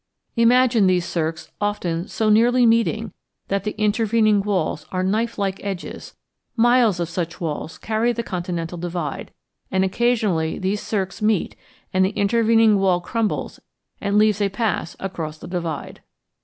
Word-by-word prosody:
Imagine 235 -2 +4
these 180 -2 +2
cirques 165 0 -3
often 180 -4 -1
so 220 -2 +1
nearly 240 +3 +4
meeting 230 0 +2 0.4
that 195 0 -1
the 210 - -3
intervening 215 0 +3
walls 185 -6 -1
are 185 0 -1
knife 225 +5 0
like 195 -2 -2
edges; 195 -3 -6 0.4
miles 240 -5 +4
of 170 - -1
such 170 0 -4
walls 160 -1 -4
carry 225 +2 0
the 235 -1 -3
continental 175 -3 -4
divide, 170 -4 -4 0.4
and 190 0 +1
occasionally 200 -7 +1
these 195 +2 -1
cirques 195 -2 -3
meet 210 -3 +1 0.4
and 190 0 +3
the 190 - +3
intervening 225 0 +4
wall 185 -2 +3
crumbles 220 +4 -2 0.4
and 200 0 +1
leaves 210 -1 +3
a 200 - +2
pass 195 -4 -2
across 160 -5 -5
the - - -10
divide. 170 -5 -4
200 Hz, 145 wpm, -22 LUFS, 175-225 Hz, 0.4 s, Imagine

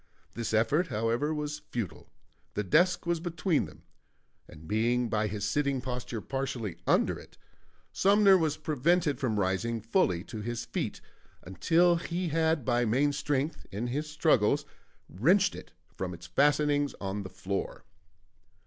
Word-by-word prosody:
This 115 -1 -3
effort, 145 +11 +2
however, 115 +7 0
was 150 -1 -3
futile; 115 -7 -5 0.5
the 105 - 0
desk 175 - +3
was 170 -1 0
between 170 -1 0
them, - - -14 0.6
and 80 +1 -13
being 120 +4 +1
by 110 0 +1
his 105 0 -3
sitting 140 +3 0
posture 125 -3 -4
partially 120 -9 -3
under - - +2
it, - - -16 0.6
Sumner 200 0 +5
was 160 -4 +1
prevented 155 -1 +1
from 110 -6 0
rising 100 +5 0
fully 95 -5 +1
to 110 0 -7
his 120 +1 -4
feet - - -4 0.4
until 170 - +3
he 170 +1 -3
had 160 -3 +1
by 120 -1 +2
main 135 +6 +2
strength, 145 +1 -2
in 105 +5 -3
his 145 +5 -3
struggles, 150 -3 +2 0.4
wrenched 180 - +3
it - - -10 0.2
from 90 -2 -4
its 85 - -12
fastenings 145 - +2
on 100 +1 -3
the 95 - -7
floor. 95 +1 -4
130 Hz, 145 wpm, -29 LUFS, 110-155 Hz, 0.6 s, Sumner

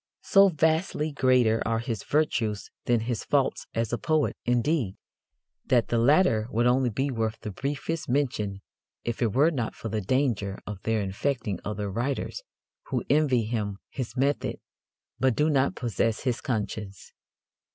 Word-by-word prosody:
So 195 0 +6
vastly 160 -1 +1
greater 125 -5 +3
are 115 0 0
his 115 -2 -3
virtues 115 -9 0
than 120 -2 +2
his 115 -1 -2
faults - - 0
as 115 0 -1
a 120 - 0
poet, 155 -2 +1
indeed, 125 - +1 0.7
that 120 -3 +3
the 120 - +2
latter 120 -4 +4
would 120 +1 +1
only 125 +1 +3
be 135 +5 -1
worth 110 -2 -1
the 105 - -5
briefest 145 - -3
mention 110 -8 -1 0.4
if 120 +1 -3
it 115 -4 +1
were 150 +5 +5
not 120 -7 -3
for 115 - -6
the 110 0 -1
danger 105 -4 0
of 105 -2 -6
their 110 0 0
infecting 100 0 -2
other 105 0 -3
writers 130 - -2 0.5
who - - -2
envy 145 -6 +3
him 105 -3 -2
his 125 -2 -5
method 140 +3 0 0.6
but 130 -2 +3
do 150 +1 +2
not 135 -1 +2
possess 115 -1 -1
his 125 -3 -1
conscience. 105 -4 -4
120 Hz, 155 wpm, -27 LUFS, 110-140 Hz, 0.7 s, So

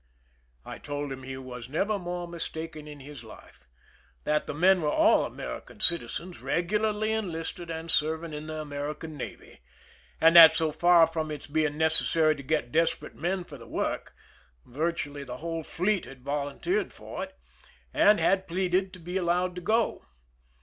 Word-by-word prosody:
I - - -8
told 145 -1 -4
him 130 0 -6
he 130 0 -6
was 125 -2 -8
never 200 +8 0
more 175 -1 -4
mis 170 -1 -5
taken 160 -1 -7
in 145 -2 -10
his 140 -3 -10
life— 110 - -15 0.6
that 150 0 0
the - - -3
men 185 +3 +4
were 150 - +1
all - - +4
American - - -7
citizens, 170 - 0
regularly 210 +5 0
enlisted 175 -5 -3
and 165 0 -4
serving 160 +1 0
in 150 +1 -6
the 155 0 -4
Amer 145 0 -4
ican 160 - -8
navy, 145 -4 -8 0.6
and 165 +1 +6
that, 165 -2 +11
so 160 -2 +1
far 170 +1 +6
from 160 -1 -3
its 150 -2 -6
being 150 -1 0
necessary 160 0 +3
to 140 - -8
get 140 -3 -1
desperate 160 -1 0
men 180 +3 -1
for 145 -5 -11
the 115 - -12
work, - - -3 0.5
virtually 145 0 -3
the 125 -2 -7
whole 165 +2 -4
fleet 185 +5 0
had 130 -2 -13
volunteered 145 - -1
for - - -8
it, - - -10 0.6
and 210 +1 +5
had 190 0 +2
pleaded 185 +1 0
to 185 - -10
be 175 +2 -4
allowed 180 0 +1
to 180 - -7
go. 220 +5 0
160 Hz, 170 wpm, -28 LUFS, 150-180 Hz, 0.6 s, that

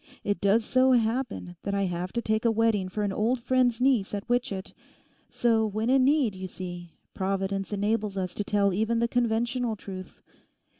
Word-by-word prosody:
It 205 0 -1
does 210 +3 +3
so 260 +2 +4
happen 230 -6 -1
that 200 0 -2
I 200 - +1
have 180 0 -3
to 235 - -2
take 220 0 0
a 235 - +4
wedding 220 -4 +1
for 210 +3 -3
an 200 -1 -1
old 230 +5 +1
friend's 250 -1 +2
niece 250 -6 +2
at 200 - -6
Witchett; 240 -6 -1 0.6
so 230 -2 +2
when 220 +3 -1
in 265 -1 +5
need, 275 -6 +3
you 185 0 -6
see, 175 -2 -8 0.2
Providence 195 0 -2
enables 205 0 -1
us 185 -2 -2
to 205 - -3
tell 200 -1 +1
even 220 +4 0
the 235 0 +2
conventional 235 0 0
truth. 190 -2 -9
215 Hz, 185 wpm, -27 LUFS, 195-235 Hz, 0.6 s, in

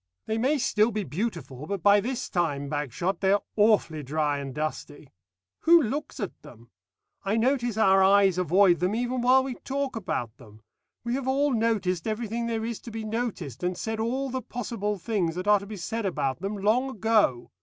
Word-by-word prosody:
They 220 +1 -1
may 275 +6 +2
still 220 -4 +2
be 215 -2 -2
beautiful, 155 - -4
but 200 -3 -4
by 205 0 +6
this 250 +4 -3
time, 145 -6 -1
Bagshot, 150 +6 -2
they 195 0 +3
are 205 - +1
awfully 205 -7 +3
dry 145 +1 -1
and 140 -1 -5
dusty. 150 0 -5 0.5
Who 340 +1 +6
looks 290 +2 -3
at 200 - -5
them? 115 0 -15 0.5
I 200 +3 0
notice 240 -2 +1
our 195 -3 +5
eyes 195 -1 +5
avoid 180 0 +4
them 180 +4 0
even 245 +1 -1
while 255 +2 +5
we 265 -1 -4
talk 275 -1 -2
about 125 - -3
them. 110 -4 -16 0.4
We 235 0 -2
have 265 0 -2
all 275 +1 +2
noticed 215 -7 0
everything 230 +1 -2
there 225 -1 -2
is 230 -1 -4
to - - -10
be 225 0 -5
noticed, 215 - -4
and 180 0 -1
said 220 0 -3
all 260 +4 -1
the 260 0 -2
possible 220 -3 -3
things 185 -4 -1
that 180 +2 -4
are 210 -1 +6
to 200 - -10
be 210 0 -7
said 220 +4 -3
about 140 -6 -2
them 200 +2 -3
long 225 +7 +2
ago. 215 - +1
205 Hz, 195 wpm, -26 LUFS, 170-235 Hz, 0.5 s, by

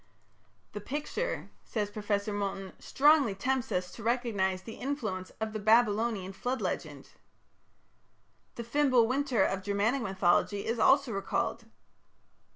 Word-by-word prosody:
"The 210 - -6
picture", 295 - -4
says 210 -2 -3
Professor 205 0 -2
Moulton, 195 -2 -3
"strongly 280 -7 +3
tempts 255 +4 -1
us 180 0 -1
to - - -10
recognize 210 -6 0
the 225 - -9
influence 215 -10 -3
of 220 -1 -3
the 215 - -3
Babylonian 215 -2 +2
Flood 250 +6 -2
Legend." - - -4 1.5
The 235 - -5
"Fimbul 255 -1 +3
winter" 265 0 +1
of 195 - -1
Germanic 205 +7 0
mythology 195 0 +1
is 230 +1 -1
also 270 +1 +4
recalled. 195 +3 -2
220 Hz, 125 wpm, -30 LUFS, 200-250 Hz, 1.5 s, also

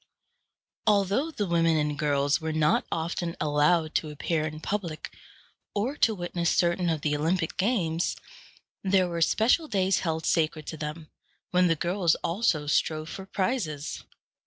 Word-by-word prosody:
Although 205 - +2
the 215 -10 -2
women 165 -2 +2
and 150 -1 0
girls 145 0 +1
were 160 0 -2
not 155 -1 +2
often 170 +1 -2
allowed 155 +2 +2
to 155 - 0
appear 155 +1 -1
in 155 0 -7
public, 170 -4 -4 0.6
or 230 +8 -1
to 220 - +3
witness 175 -2 -1
certain 175 0 +2
of 160 -3 -1
the 150 0 0
Olympic 165 +3 0
games, 180 -6 0 0.7
there 190 -1 +3
were 170 -1 -3
special 235 - +3
days 190 -5 +1
held 160 -2 -2
sacred 155 -2 +1
to 160 - -5
them, 155 +1 -6 0.4
when 180 0 +4
the 165 - +3
girls 175 +1 +1
also 170 -5 +1
strove 155 +1 0
for 190 0 -8
prizes. 185 - -2
170 Hz, 150 wpm, -27 LUFS, 155-190 Hz, 0.7 s, when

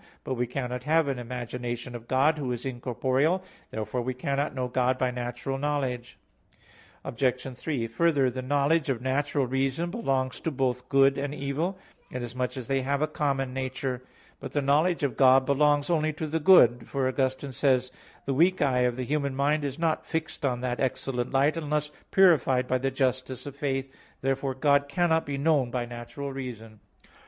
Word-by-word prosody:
But 130 - -3
we 125 -1 -1
cannot 125 0 -4
have 160 0 +3
an 135 -3 -2
imagination 120 0 -5
of 120 -1 -8
God, 145 +4 +3
Who 130 -4 -2
is 120 +1 -4
incorporeal. 130 +7 0 0.3
Therefore 110 +3 -3
we 125 +1 -3
cannot 140 +2 -1
know 130 -1 -1
God 125 +1 +1
by 130 -1 0
natural 125 +2 -4
knowledge. 135 -4 -2 0.9
Obj. 125 +1 -1
3: 125 -2 -2
Further, 135 +2 +2
the 130 +1 -4
knowledge 145 +3 +1
of 130 -4 0
natural 140 +2 0
reason 135 +6 -1
belongs 135 - -1
to - - -2
both 125 -3 -2
good 135 0 +4
and 145 +1 -3
evil, 150 +8 -2 0.3
inasmuch 125 +1 -4
as 125 -3 -6
they 135 0 +1
have 140 +3 0
a - - +2
common 135 -4 -1
nature. 130 -1 -3 0.4
But - - -8
the 145 - +1
knowledge 155 +5 +2
of 140 - -1
God 130 0 +6
belongs 145 +2 +2
only 155 -2 +1
to 155 +1 -4
the 160 +1 -1
good; 125 -9 +6
for 135 -2 0
Augustine 130 +1 -1
says 130 0 +2
(De - - -27
Trin. - - -23
i): - - -25
"The 135 - 0
weak 175 +7 +3
eye 130 -3 +2
of 125 -1 +2
the 130 - -2
human 140 -1 -1
mind 145 +2 +1
is 140 -1 -3
not 165 -2 0
fixed 160 -1 -3
on 125 -3 0
that 125 -1 -2
excellent 125 -1 -1
light 140 +4 +3
unless 150 -2 -2 0.2
purified 140 -9 +4
by 130 0 +1
the 135 +1 0
justice 130 -1 -1
of 140 -1 -7
faith." 135 -1 -2 0.3
Therefore 135 0 -1
God 140 +1 +3
cannot 160 +1 +1
be 140 -1 -2
known 140 -3 +2
by 120 0 -2
natural 120 +4 -7
reason. 115 -5 -7
135 Hz, 185 wpm, -27 LUFS, 125-145 Hz, 0.9 s, God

